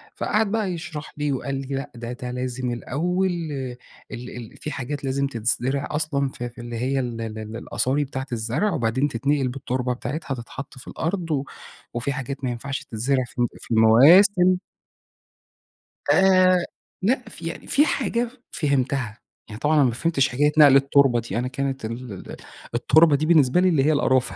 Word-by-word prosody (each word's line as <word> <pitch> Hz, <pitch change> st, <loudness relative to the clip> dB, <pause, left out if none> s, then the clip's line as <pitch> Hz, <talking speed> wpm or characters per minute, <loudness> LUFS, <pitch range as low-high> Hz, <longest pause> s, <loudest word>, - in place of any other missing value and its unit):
فقعد 215 Hz, -1 st, 0 dB
بقى 215 Hz, -4 st, 0 dB
يشرح 160 Hz, -3 st, -7 dB
لي، 145 Hz, -1 st, 0 dB
وقال 135 Hz, +1 st, -3 dB
لي: 135 Hz, 0 st, -4 dB
"لأ 135 Hz, -, -5 dB
ده 120 Hz, 0 st, -6 dB
ده 125 Hz, 0 st, -6 dB
لازم 125 Hz, 0 st, -3 dB
الأول 175 Hz, +10 st, -1 dB, 0.8 s
ال 120 Hz, +1 st, -7 dB
ال 115 Hz, -3 st, -10 dB
في 150 Hz, -, -6 dB
حاجات 140 Hz, +1 st, -5 dB
لازم 135 Hz, +1 st, 0 dB
تتزرع 125 Hz, +3 st, -1 dB
أصلًا 150 Hz, -3 st, 0 dB
في 120 Hz, -2 st, -6 dB
في 120 Hz, -, -12 dB
اللي 120 Hz, 0 st, -6 dB
هي 135 Hz, +3 st, 0 dB
ال 120 Hz, -3 st, -3 dB
ال 110 Hz, 0 st, -6 dB
الأصاري 135 Hz, +4 st, 0 dB
بتاعة 135 Hz, 0 st, -5 dB
الزرع 120 Hz, -, 0 dB
وبعدين 130 Hz, 0 st, +1 dB
تتنقل 140 Hz, +2 st, 0 dB
بالتربة 125 Hz, -1 st, -2 dB
بتاعتها 135 Hz, +3 st, -4 dB
تتحط 130 Hz, +3 st, -9 dB
في 125 Hz, -, -13 dB
الأرض 170 Hz, -1 st, -3 dB
و 140 Hz, -2 st, 0 dB, 0.5 s
وفي 125 Hz, +4 st, -2 dB
حاجات 135 Hz, 0 st, -5 dB
ما 125 Hz, -, 0 dB
ينفعش 135 Hz, +2 st, -4 dB
تتزرع 130 Hz, +4 st, 0 dB
في -, -, -18 dB
الن 120 Hz, -, +3 dB
في 115 Hz, -, -3 dB
مواسم." 180 Hz, -, +6 dB, 1.5 s
آآ، 185 Hz, -1 st, +5 dB, 0.4 s
لأ 245 Hz, +6 st, 0 dB
في 165 Hz, -, -10 dB
يعني 165 Hz, -, -7 dB
في 290 Hz, +2 st, +4 dB
حاجة 240 Hz, -5 st, 0 dB, 0.2 s
فهمتها، 135 Hz, -6 st, -1 dB, 0.3 s
يعني 105 Hz, +1 st, -8 dB
طبعًا 150 Hz, +2 st, +2 dB
أنا 150 Hz, -, +5 dB
ما 125 Hz, -, +3 dB
فهمتش 135 Hz, +2 st, +1 dB
حكاية 145 Hz, +4 st, +2 dB
نقل 145 Hz, -3 st, +8 dB
التربة 135 Hz, -2 st, +4 dB
دي، 115 Hz, 0 st, -3 dB
أنا 125 Hz, -, -1 dB
كانت 135 Hz, -2 st, -3 dB
ال 115 Hz, 0 st, -6 dB
ال 95 Hz, -, -9 dB, 0.4 s
التربة 155 Hz, +5 st, +5 dB
دي 145 Hz, +2 st, 0 dB
بالنسبة 155 Hz, -1 st, +4 dB
لي 185 Hz, -, +4 dB
اللي 155 Hz, -6 st, +3 dB
هي 155 Hz, -, +4 dB
القرافة، 130 Hz, -3 st, +2 dB
135 Hz, 175 wpm, -23 LUFS, 120-155 Hz, 1.5 s, نقل